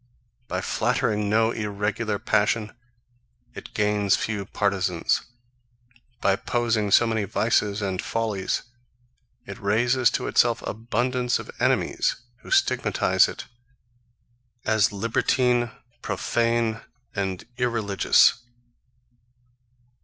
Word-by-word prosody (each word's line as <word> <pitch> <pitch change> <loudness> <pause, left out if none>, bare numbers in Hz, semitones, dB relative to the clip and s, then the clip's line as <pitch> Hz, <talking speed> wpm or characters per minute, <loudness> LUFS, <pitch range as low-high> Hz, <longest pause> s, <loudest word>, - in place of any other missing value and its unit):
By 90 +1 -2
flattering 110 -2 0
no 110 +2 +3
irregular 105 0 -2
passion, 105 +1 0 0.8
it - - -11
gains 105 -1 +2
few 105 -3 -3
partizans: 95 -5 0 1.0
By 100 - +3
opposing 115 +1 0
so 120 - +5
many 110 -2 0
vices 105 0 0
and 95 -1 -2
follies, 110 -4 -2 0.8
it - - -8
raises 120 +4 +2
to - - -6
itself 120 -1 +2
abundance 120 +3 -1
of - - -8
enemies, - - +1 0.2
who - - -14
stigmatize 390 0 +3
it - - -7 1.2
as 110 -2 +3
libertine 120 +3 +1 0.3
profane, 115 -1 0 0.3
and 95 -2 -3
irreligious. 115 -4 +3
110 Hz, 95 wpm, -24 LUFS, 100-120 Hz, 1.2 s, so